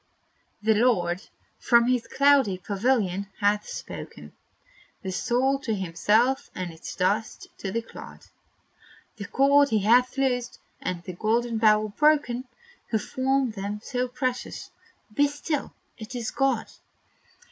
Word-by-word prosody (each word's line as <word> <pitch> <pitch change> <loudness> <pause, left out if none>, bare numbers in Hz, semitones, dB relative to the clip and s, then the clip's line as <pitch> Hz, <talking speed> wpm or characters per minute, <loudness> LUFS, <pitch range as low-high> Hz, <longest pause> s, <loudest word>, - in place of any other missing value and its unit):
The 220 +1 +4
Lord, 195 -6 +2 0.4
from 235 -1 +4
his 250 -1 +1
cloudy 275 -8 +3
pavilion, 200 0 0
hath 205 0 +1
spoken - - -8 0.7
The 190 - -3
soul 255 +8 +1
to 230 -6 -2
himself, 215 +9 +1
and 180 -2 -4
its 160 - -8
dust 215 +5 -1
to 195 - -4
the 230 +3 -2
clod; - - -12 0.9
The 200 - -6
cord 280 +1 +4
He 215 -4 +1
hath 250 +5 +4
loosed, 250 -3 0 0.2
and 175 -2 -4
the 185 - -7
golden 225 +4 0
bowl 215 -1 +4
broken, 260 0 +2 0.4
Who 220 - +2
formed 260 +1 0
them 205 +1 -4
so 250 0 -2
precious. 250 0 -4 0.4
Be 290 +6 +4
still! 290 +1 -3 0.3
it 220 +3 -8
is 235 -3 -3
God. 270 -5 0
230 Hz, 130 wpm, -26 LUFS, 205-260 Hz, 0.9 s, The